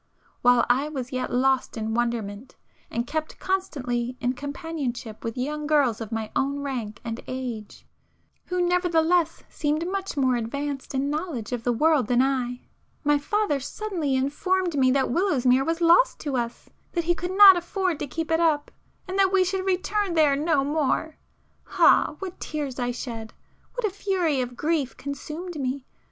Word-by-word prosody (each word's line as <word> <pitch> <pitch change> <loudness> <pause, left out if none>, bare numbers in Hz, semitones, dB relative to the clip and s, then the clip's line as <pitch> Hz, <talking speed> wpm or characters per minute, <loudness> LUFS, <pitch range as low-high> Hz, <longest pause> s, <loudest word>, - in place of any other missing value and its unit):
While 245 -1 +5
I 265 +5 +2
was 265 -4 -5
yet 255 -1 -2
lost 260 0 +1
in 220 0 -2
wonderment, 235 -1 -2 0.3
and 235 +1 -2
kept 310 +3 -4
constantly 250 -10 -2
in 250 -1 0
companionship 280 -5 -5
with 230 +2 -4
young 295 +4 -2
girls 280 -8 +2
of 220 0 -6
my 220 -1 -3
own 280 +1 0
rank 240 -6 -4
and 230 0 -4
age, 245 -5 -6 0.6
who 360 0 -2
nevertheless 345 -1 +2
seemed 305 +3 -1
much 385 -3 -3
more 260 -2 +3
advanced 275 +4 -4
in 275 +2 0
knowledge 300 - -3
of 245 -2 -2
the 245 - +2
world 295 0 +3
than 245 +2 +3
I, 255 -2 -1 0.4
my 295 -1 +3
father 405 -1 0
suddenly 325 -2 -2
informed 340 +6 0
me 260 -2 +4
that 265 -1 +2
Willowsmere 265 -7 +3
was 330 +3 -1
lost 345 +10 +5
to 285 -3 -2
us,—that 245 +8 -4
he 345 +1 +2
could 360 +3 -4
not 400 -2 +11
afford 355 -1 -1
to - - -3
keep 325 +5 -4
it 325 - +3
up,—and 335 +4 -2
that 385 -1 +4
we 385 -1 +4
should 380 +1 -2
return 380 0 0
there 300 -3 +4
no 295 -1 +2
more. 305 +2 0 0.6
Ah, - - +5
what 375 -2 -7
tears 285 -4 -4
I 245 0 0
shed!—what 240 - -7
a 415 - 0
fury 365 -8 0
of 245 -1 -5
grief 300 -4 -1
consumed 305 +4 -6
me! 260 0 -3
285 Hz, 165 wpm, -25 LUFS, 250-340 Hz, 0.6 s, not